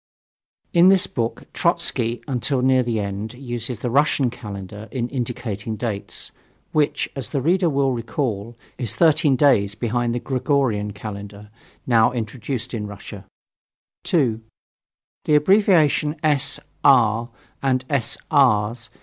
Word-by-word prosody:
In 175 +1 +7
this 190 -1 +4
book 115 -2 -3
Trotzky 115 +1 0
(until 130 0 0
near 130 0 +4
the 120 -3 -1
end) 100 +3 -4
uses 120 -3 -4
the 125 - -1
Russian 140 -2 +2
Calendar 105 -2 -8
in 120 0 -2
indicating 115 -4 -4
dates, 105 -3 -4 0.4
which, 150 -1 +1
as 135 -4 -5
the 140 - -1
reader 175 +5 +2
will 140 -2 +1
recall, 115 -3 -3 0.2
is 120 -5 -2
13 155 -3 +4
days 120 -8 +3
behind 120 +1 -1
the - - -1
Gregorian 130 -6 0
Calendar, 105 0 -9 0.3
now 115 -1 +4
introduced 120 +1 -4
in 105 -3 -3
Russia. 100 -1 -10 0.8
2. 120 -9 +1 0.8
The 150 - +3
abbreviation 155 -3 +3
S. 145 -3 +1 0.2
R. 115 +3 +4 0.3
and 130 -1 0
S. 125 -5 0
R.' 115 -7 +4
120 Hz, 125 wpm, -22 LUFS, 110-140 Hz, 0.8 s, In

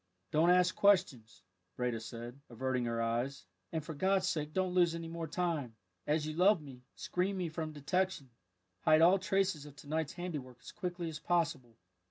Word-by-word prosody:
"Don't 160 +3 +4
ask 180 0 +4
questions," 180 - +2 0.3
Breda 125 -2 -1
said, 120 +4 -8
averting 125 +1 -1
her 115 -1 -1
eyes, 120 +4 -2 0.3
"and 160 -2 -3
for 160 - -5
God's 190 +4 +2
sake 155 -4 -1
don't 185 +1 0
lose 175 -2 +4
any 165 0 -5
more 165 0 -5
time. 155 -8 -2 0.3
As 150 +1 +1
you 155 - -3
love 180 +4 +5
me, 135 -4 -11
screen 190 +2 -1
me 180 -3 -2
from 155 0 -4
detection; 155 -1 -1 0.5
hide 155 - +5
all 185 +3 +6
traces 190 -6 0
of 145 - -13
to 145 - -13
night's 155 0 -1
handiwork 150 -9 -6
as - - -10
quickly 175 -1 -4
as 155 -2 -5
possible." 155 -10 -1
160 Hz, 180 wpm, -33 LUFS, 135-180 Hz, 0.5 s, all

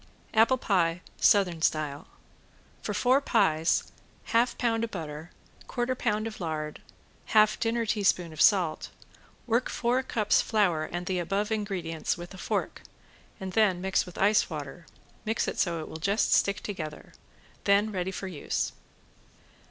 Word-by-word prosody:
~APPLE 225 +4 +5
PIE 175 -7 +1 0.2
SOUTHERN 180 -5 +3
STYLE~ 150 -2 -1 0.7
For - - -3
four 260 +3 +3
pies 160 - +2 0.4
half 235 +2 +1
pound 230 -1 0
butter, 160 -4 -6 0.4
quarter 245 +1 -1
pound 215 -4 -1
of 220 -3 -6
lard, 155 -2 -4 0.6
half 215 0 +5
dinner 230 0 0
teaspoon 185 -6 +1
of 155 - -4
salt, 180 -7 +3 0.6
work 235 +1 +1
four 245 +2 +1
cups 220 -5 +2
flour 180 -8 +1
and 175 +2 -5
the 185 0 -1
above 200 +5 -1
ingredients 190 -8 -2
with 175 +2 -9
a 190 - -11
fork, - - -2 0.6
and 190 -1 -6
then 205 -5 +3
mix 190 0 0
with 180 - -11
ice 205 +2 +3
water 155 +1 -7
and - - -29 0.2
mix 220 +2 0
it - - -3
so 170 -3 0
it - - -7
will - - -7
just 200 +6 +1
stick 200 0 +2
together. 155 -7 -6 0.5
Then 205 +2 +3
ready 185 -2 -2
for 190 0 -5
use. 175 -6 -2
195 Hz, 150 wpm, -28 LUFS, 165-220 Hz, 0.7 s, ~APPLE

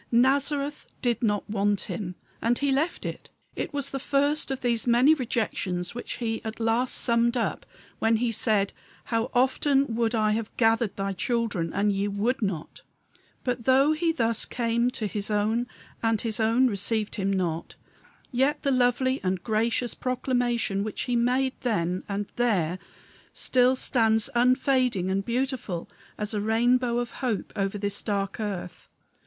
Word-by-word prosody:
Nazareth 280 +4 +1 0.2
did 240 -3 +1
not 205 -3 0
want 205 -1 +1
Him; 180 -5 -5 0.3
and 235 +1 +2
he 280 -1 +1
left 300 +6 0
it. - - -6 0.3
It - - -3
was 285 -2 -3
the 270 - -3
first 285 +3 +1
of 270 -1 -3
those 235 -1 0
many 245 +6 +6
rejections 210 - -1
which 240 - -5
He 225 -2 -3
at 220 0 -6
last 230 +3 +1
summed 235 0 +2
up 235 - -2 0.3
when 225 0 +3
he 235 +1 +1
said, 210 -3 +1 0.3
"How 230 +1 -1
often 265 +1 +2
would 230 0 +1
I 215 -1 +2
have 220 0 -3
gathered 225 -2 +2
thy 195 0 -2
children, 205 -5 -1
and 205 +1 +1
ye 200 +1 0
would 210 +6 -1
not." 190 -7 -3 0.6
But, 245 -2 -2
though 270 +3 +5
he 330 +2 +1
thus 230 -8 0
came 235 0 0
to 230 -3 -3
his 205 0 -2
own 215 +3 +1 0.3
and 225 -1 +2
his 225 -1 -2
own 225 +4 +3
received 215 -1 0
him 195 -1 -1
not, 170 -4 -2 0.6
yet 275 +4 +1
the 275 - +2
lovely 255 +1 +2
and 185 -1 -1
gracious 230 +2 +1
proclamation 245 -5 0
which 215 -1 -3
he 245 - -1
made 250 +2 +2
then 185 -7 0
and 200 +1 -2
there 185 -8 +1 0.5
still 255 0 +3
stands 225 -4 +1
unfading 250 -5 +2
and 195 +1 0
beautiful 240 -7 -2 0.3
as 210 +1 -2
a 210 - -1
rainbow 240 +3 +2
of 240 0 -2
hope 235 -7 -2
over 195 0 -1
this 200 0 -2
dark 200 -2 -2
earth. 185 -4 -5
230 Hz, 160 wpm, -26 LUFS, 205-255 Hz, 0.6 s, many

